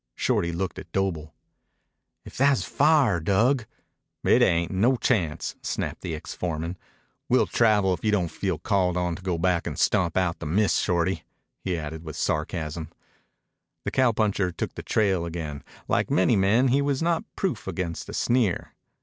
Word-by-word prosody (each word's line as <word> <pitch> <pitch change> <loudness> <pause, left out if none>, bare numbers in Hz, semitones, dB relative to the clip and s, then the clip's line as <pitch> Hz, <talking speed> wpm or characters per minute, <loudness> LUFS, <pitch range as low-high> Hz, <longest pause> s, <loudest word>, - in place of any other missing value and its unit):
Shorty 85 - 0
looked 90 +1 -3
at - - -12
Doble. 85 -6 -2 0.9
"If - - -11
tha's 140 +1 +3
fire, 145 - +3
Dug 110 - +2 0.3
" - - -56
"It - - +4
ain't. 85 0 +2
No 110 +8 +3
chance," 85 -11 0
snapped - - -3
the 85 -3 -3
ex 75 - -7
foreman. 85 0 -3 0.5
"We'll - - +4
travel 105 -5 +3
if 85 - -6
you 110 - +2
don't 90 -6 +1
feel 95 -5 -2
called 90 0 +1
on 90 -1 -1
to - - -10
go 90 -2 -1
back 90 0 +1
an' - - -4
stomp 90 -5 +1
out 90 -2 0
the 80 - -5
mist, 100 +6 +2
Shorty," 90 +1 0 0.4
he 90 -2 -2
added 80 +1 -6
with 80 -3 -7
sarcasm. 80 0 -2 1.0
The - - -1
cowpuncher 110 -7 +2
took - - -4
the - - -7
trail 95 -5 +1
again. 80 -5 -5 0.2
Like - - +1
many 95 +5 +3
men, 105 +7 +3
he 135 +3 +3
was 140 +1 0
not 170 -1 +1
proof 160 - -2
against 90 -3 -4
a - - -6
sneer. 120 -7 0
95 Hz, 170 wpm, -25 LUFS, 85-110 Hz, 1.0 s, It